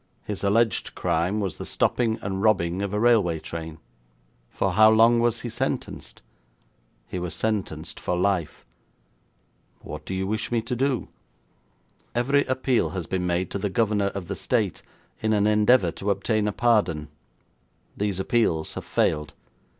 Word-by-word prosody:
'His 105 -2 -5
alleged 110 +1 +1
crime 90 +4 0
was 95 -5 -3
the - - -4
stopping, 115 -2 +1
and 95 0 -3
robbing, 95 -4 +2
of 100 -1 -2
a 105 - -1
railway 105 -8 +3
train.' 80 0 -7 0.7
'For 95 - -1
how 110 +3 +6
long 115 +2 +5
was 115 -1 +1
he 120 - -4
sentenced?' 115 - -4 0.8
'He 90 - -4
was 90 -1 -4
sentenced 95 -8 -3
for 90 - -2
life.' 90 -3 -1 1.2
'What - - -8
do 95 - -3
you 95 0 -1
wish 110 +4 -2
me 120 - +2
to 120 +2 -3
do?' 130 0 -1 1.1
'Every 140 +4 +2
appeal 130 -1 +1
has 90 - -3
been 90 0 -2
made 90 +1 -1
to 100 - -2
the 100 - -1
governor 105 -1 +1
of 100 -3 -5
the 100 - -3
State - - -1 0.4
in 110 0 +1
an 105 -1 +2
endeavour 105 -2 +4
to 100 - -4
obtain 105 +2 +1
a - - +1
pardon. 95 -11 +1 0.9
These 100 -2 -1
appeals 95 -6 +1
have - - -7
failed. 75 0 0
100 Hz, 160 wpm, -25 LUFS, 90-115 Hz, 1.2 s, how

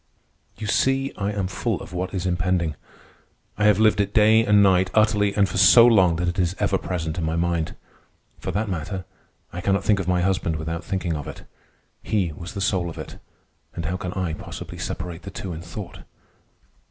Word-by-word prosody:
You 110 - -6
see, 135 +5 +1
I 100 0 -2
am 100 -2 -2
full 95 +1 -2
of 90 - -10
what 90 +1 -3
is 95 -2 -3
impending. 90 -2 0 0.8
I 105 - 0
have 105 -2 +5
lived 110 -1 +4
it 100 0 -3
day 110 +1 +6
and 105 -2 +5
night 95 -1 +4
utterly 105 -2 +3
and 100 -2 +3
for 95 0 -2
so 115 +6 +8
long 95 -8 +5
that 90 +1 -1
it 90 +3 -1
is 90 0 +1
ever - - +1
present 80 -2 -3
in - - -3
my 80 +1 -1
mind. 85 -1 -1 0.6
For - - -5
that 105 +4 -1
matter, 95 +1 -4 0.5
I 90 - -5
cannot 100 +2 +1
think 105 -2 +2
of 95 - -3
my 90 -1 +2
husband 90 -3 0
without 80 +2 -4
thinking 90 -2 -2
of 75 0 -6
it. - - -9 0.6
He 95 -6 0
was 85 +6 -9
the 100 - -3
soul 95 -3 0
of 80 - -9
it, - - -8 0.6
and 85 - -4
how 90 +3 -2
can 90 -1 -5
I 90 -4 -2
possibly 80 - -8
separate 90 -1 -5
the 95 - -8
two 95 -1 -6
in 80 - -7
thought? 90 +2 -8
95 Hz, 205 wpm, -23 LUFS, 85-100 Hz, 0.8 s, so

